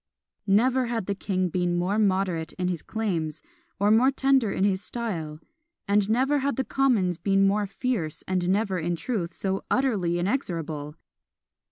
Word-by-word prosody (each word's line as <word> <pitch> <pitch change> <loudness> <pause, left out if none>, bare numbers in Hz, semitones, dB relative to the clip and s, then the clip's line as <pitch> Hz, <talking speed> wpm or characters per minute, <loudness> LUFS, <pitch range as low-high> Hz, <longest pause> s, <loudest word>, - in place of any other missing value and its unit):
Never 250 +5 +3
had 230 -4 -2
the 200 - -1
king 185 -2 -1
been 175 0 0
more 190 +5 0
moderate 185 -5 0
in 180 -1 -2
his 175 -3 -3
claims, 175 - -3 0.4
or 205 +1 +3
more 235 +4 +5
tender 270 -5 +2
in 190 - -1
his 195 -1 +2
style; 165 -11 -4 0.5
and 200 0 +2
never 265 +6 +2
had 280 +1 -1
the 265 - 0
commons 230 -12 +1
been 195 -1 +3
more 205 +1 +1
fierce, 195 - -2
and 185 -1 0
never, 195 -1 +1
in 170 +1 -1
truth, 180 -2 -3
so 190 +2 -2
utterly 205 -10 +1
inexorable! 165 - -2
195 Hz, 160 wpm, -26 LUFS, 175-230 Hz, 0.5 s, more